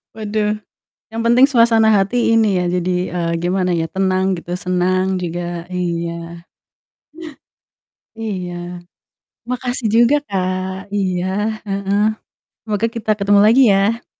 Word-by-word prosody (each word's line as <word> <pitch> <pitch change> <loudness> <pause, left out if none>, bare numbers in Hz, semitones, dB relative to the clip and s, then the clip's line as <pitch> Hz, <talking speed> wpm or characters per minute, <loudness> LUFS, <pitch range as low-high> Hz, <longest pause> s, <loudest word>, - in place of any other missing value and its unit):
Waduh! 215 -1 -1 0.5
Yang 225 +1 -3
penting 240 +3 +6
suasana 230 -4 +4
hati, 225 +4 +2
ini 215 -4 +3
ya, 180 - -1
jadi, 180 0 0 0.2
eee, 170 -1 -1
gimana 180 +1 0
ya, 165 -1 0
tenang 190 +1 0
gitu, 175 +1 -7
senang 185 +1 0
juga, 175 0 -4
iya. 170 -1 -4 1.7
Iya. 190 -6 -4 1.0
Makasih 250 -2 -2
juga, 240 +5 +5
Kak, 185 0 -3
iya, 185 -2 -1 0.4
heeh. 195 0 -1 0.7
Semoga 215 0 -1
kita 220 -2 -3
ketemu 200 0 +4
lagi 235 +5 +6
ya! 205 +5 +1
190 Hz, 115 wpm, -18 LUFS, 180-220 Hz, 1.7 s, penting